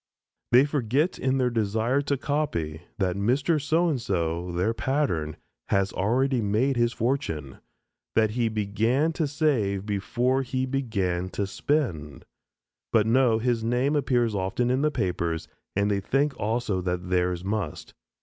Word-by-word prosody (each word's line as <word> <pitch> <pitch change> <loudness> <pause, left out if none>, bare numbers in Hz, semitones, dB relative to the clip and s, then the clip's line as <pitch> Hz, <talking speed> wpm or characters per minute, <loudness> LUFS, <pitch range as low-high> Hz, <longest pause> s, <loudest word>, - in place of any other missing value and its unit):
They 125 +3 +7
forget 145 +3 0
in 130 0 +1
their 125 -2 +1
desire 115 +4 +1
to 140 0 -1
copy, 105 - -2 0.2
that 95 -3 0
Mr. 135 - +1
"So 160 +5 +2
and 145 -7 0
So," 85 -4 -1
their 90 +6 0
pattern, 115 - -1 0.3
has 100 -1 +1
already 125 +6 +1
made 110 +7 +1
his 120 -1 +2
fortune; 115 - -2 0.6
that 110 -1 +3
he 115 0 0
began 110 +9 +1
to 160 -2 0
save 130 - 0
before 120 +6 0
he 130 0 -2
began 100 -9 -1
to 100 - +1
spend. 95 - -2 0.7
But 110 -2 +4
no, 120 0 +4
his 115 0 0
name 125 +5 +1
appears 125 -5 +1
often 100 +6 0
in 130 +2 +1
the 150 - +3
papers 85 - -2 0.3
and 100 +1 +2
they 100 - +1
think 135 +7 0
also 110 -3 -1
that 90 0 -3
theirs 90 -1 +1
must. 100 -5 -3
115 Hz, 150 wpm, -26 LUFS, 95-135 Hz, 0.7 s, They